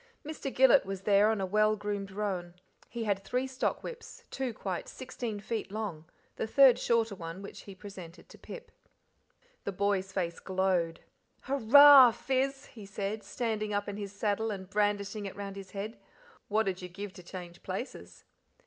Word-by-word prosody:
Mr. 300 -3 -5
Gillet 265 +1 +6
was 195 -1 -5
there 205 +1 +4
on 220 -2 0
a 190 - 0
well 215 +3 +3
groomed 205 -1 -4
roan; 190 -4 -3 0.3
he 235 -1 -4
had 200 -2 -1
three 250 +4 -1
stock 260 -1 -2
whips, 465 -1 -9
two 265 -2 -2
quite 190 -5 -4
sixteen 240 -4 -5
feet 215 -1 -4
long, 200 -7 -4 0.3
the - - -2
third 260 0 +6
shorter 230 -3 +1
one, 170 +1 -7
which 200 - -10
he 195 - -9
presented 185 -4 -11
to - - -15
Pip. 480 - -10 0.9
The - - -2
boy's 195 0 0
face 175 -3 -2
glowed. 185 -3 0 0.4
"Hurrah, 275 +1 +8
Fizz!" 270 +2 -1
he 215 -4 -10
said; 205 +1 -4
standing 215 -3 -2
up 205 0 -1
in 205 0 -4
his 200 -2 -5
saddle 210 +2 -1
and 190 -3 -5
brandishing 205 +1 -1
it 195 - -8
round 200 0 -6
his 195 -1 -9
head. 210 +4 -6 0.5
"What 215 0 +1
'ud 185 -1 -2
you 180 - -7
give 200 +2 -7
to 185 - -11
change 175 -1 -9
places?" 190 +8 -7
205 Hz, 175 wpm, -30 LUFS, 190-225 Hz, 0.9 s, Hurrah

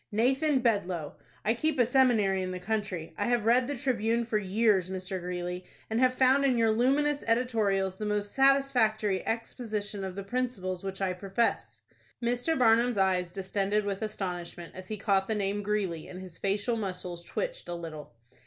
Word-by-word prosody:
"Nathan 265 +6 +2
Bedloe. 185 - 0 0.3
I 220 - +3
keep 310 +5 0
a 245 - +5
seminary 225 -7 +3
in 185 - -3
the 185 0 -4
country. 190 -4 -3
I - - +1
have 240 -3 +1
read 245 +2 +4
the 285 - -2
'Tribune' 235 -2 0
for 220 -2 0
years, 200 -2 +2
Mr. 185 0 -4
Greeley, 180 0 -4 0.3
and 220 - +1
have 255 0 +3
found 265 +2 +4
in 260 -3 +3
your 225 -1 +3
luminous 280 +6 +2
editorials 215 -6 +1
the 215 - -4
most 205 0 -1
satisfactory 250 -8 +3
exposition 215 -3 -3
of 190 -1 -5
the 200 - -5
principles 195 -5 -3
which 195 0 -5
I 185 -1 +1
profess." 195 +5 -1 0.4
Mr. 245 +7 0
Barnum's 235 -1 +4
eyes 185 -2 +2
distended 200 +2 0
with 200 0 -3
astonishment 180 -5 -5
as 185 0 -9
he 215 - -4
caught 195 -2 +1
the 220 - 0
name 205 0 -1
Greeley, 200 -6 -2
and 185 - -8
his 185 -3 -10
facial 205 +4 0
muscles 180 -4 -5
twitched - - -4
a 175 - -3
little. 155 -6 -8
210 Hz, 175 wpm, -29 LUFS, 185-240 Hz, 0.4 s, a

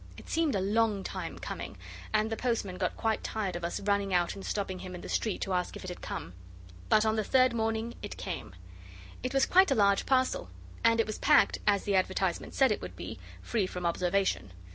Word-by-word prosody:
It - - -12
seemed 320 -6 +2
a 195 - +1
long 210 0 +1
time - - -5
coming, - - -6 0.3
and 215 +1 +1
the - - 0
postman 220 -6 -2
got 180 - -1
quite 225 -1 0
tired 200 -5 -2
of 175 - -5
us 170 - -2
running 200 -1 +1
out 175 -1 +2
and 195 - -9
stopping 190 -3 -2
him 185 0 -7
in 175 - -8
the - - -8
street 215 -4 -1
to 195 - -1
ask 180 -1 -1
if - - -8
it 185 - -5
had 180 - -7
come. 90 - -5 0.6
But 215 - +5
on 220 0 +2
the 215 - +1
third 255 +2 +4
morning 225 0 -1
it - - -6
came. 90 - -5 0.7
It 255 - -2
was 270 0 +3
quite 375 0 +5
a 270 - +3
large 200 -2 +3
parcel, 260 - +1 0.3
and 230 0 +4
it 225 - +4
was 215 - -5
packed, 295 -1 +4
as 200 -2 +3
the 205 - 0
advertisement 190 -1 0
said 265 -3 +4
it 210 - -1
would - - -7
be, - - -7 0.2
'free 215 -6 0
from 180 -1 -5
observation. 180 - 0
205 Hz, 225 wpm, -30 LUFS, 185-230 Hz, 0.7 s, But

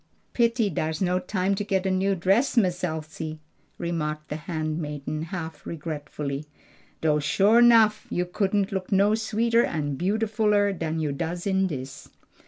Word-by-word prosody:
"Pity 235 -3 +2
dars 155 0 -2
no 180 -1 +1
time 185 +1 -1
to 195 - -2
get 195 -2 0
a 190 - +1
new 195 +1 +1
dress, 195 +10 +2
Miss 185 -4 +2
Elsie," 155 -1 -4 0.4
remarked 155 -3 -3
the - - -3
handmaiden 155 -2 -4
half 165 -2 -6
regretfully. 150 -2 -5 0.5
"Doe 150 -1 +2
sho' 200 +10 +4
nuff 225 -3 +5
you 180 - -1
couldn't 195 +2 0
look 190 -2 -4
no 200 +2 +4
sweeter 225 +2 +2
and 145 -4 -2
beautifuller 210 +1 +2
dan 165 -3 -3
you 155 -2 -1
does 170 +4 -4
in 190 -1 +2
dis." 135 -3 -7
180 Hz, 150 wpm, -26 LUFS, 155-205 Hz, 0.5 s, nuff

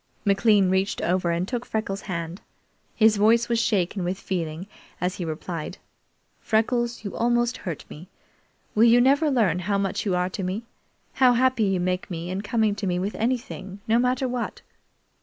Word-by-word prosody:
McLean 200 -1 +4
reached 190 +2 0
over 180 0 0
and 170 +2 0
took 245 0 -3
Freckles' 215 -4 -3
hand. 170 +1 -4 0.5
His 220 -1 +4
voice 230 +3 +4
was 235 -1 +1
shaken 195 -4 0
with 180 +2 -2
feeling 170 -2 -3 0.3
as 180 +3 -2
he 175 - -3
replied: 160 0 -5 0.6
"Freckles, 235 +1 0
you 200 - -5
almost 240 +1 +1
hurt 170 -6 -6
me. 165 +5 -11 0.7
Will 220 +2 +5
you 235 +1 +6
never 280 +5 +4
learn 210 - +2
how 200 +3 0
much 195 -1 -1
you 195 -4 0
are 180 0 +1
to 195 - -5
me 190 +5 -3 0.5
how 255 -2 +5
happy 250 -2 +2
you 195 -2 +1
make 180 +1 -1
me 170 0 -5
in 190 +1 -2
coming 215 0 +1
to 200 - -3
me 180 -1 0
with 195 +3 -2
anything, 225 -5 -3
no 225 +1 +3
matter 250 +1 +1
what?" 245 -1 -4
200 Hz, 175 wpm, -25 LUFS, 180-235 Hz, 0.7 s, you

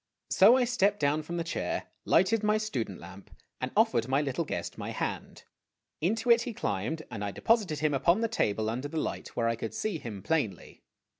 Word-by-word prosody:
So 220 +7 +7
I 255 - +3
stepped 205 -4 +2
down 150 +1 +2
from 170 +3 -5
the 170 - -1
chair, 165 - -3
lighted 210 +4 +3
my 215 0 +2
student 125 - -3
lamp, 95 +3 -12 0.3
and - - -2
offered 115 - +3
my 135 +2 +2
little 145 +3 -1
guest - - -4
my - - -5
hand. - - -4 0.6
Into 225 +8 +1
it 235 0 +6
he 235 -2 -5
climbed, 105 - -2
and 105 -3 -5
I 100 - -1
deposited 195 - +1
him 155 -1 +2
upon 170 - +3
the 230 - +2
table 110 - 0
under 125 +5 -2
the 160 +2 -6
light, - - -4
where 115 -1 +1
I 115 - +1
could 110 -1 -5
see 205 -7 -2
him 105 -7 -7
plainly. 145 -7 -2
155 Hz, 205 wpm, -29 LUFS, -, 0.6 s, So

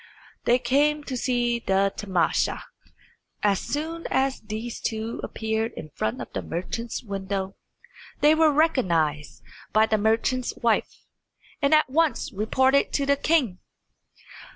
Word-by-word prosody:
They 240 - +5
came 290 +4 +2
to 265 - -5
see 240 -1 0
the 195 -2 +1
tamasha. 185 -5 0 0.8
As 200 -2 +3
soon 325 +3 -4
as 270 0 +1
these 220 +2 -6
two 220 0 -3
appeared 220 +1 -2
in 155 - -9
front 110 - -2
of - - -8
the - - -2
merchant's 230 +9 -4
window 195 -2 -4 0.6
they 300 +1 +6
were 315 -1 +4
recognised 170 - +1 0.3
by 215 0 +5
the 220 -1 +1
merchant's 225 +4 +1
wife, 230 -2 -1 0.6
and 280 0 +2
at 305 - +4
once 295 -1 0
reported 260 +7 +2
to 280 - +1
the 280 0 +3
king. 280 - +1
235 Hz, 130 wpm, -25 LUFS, 205-280 Hz, 0.8 s, they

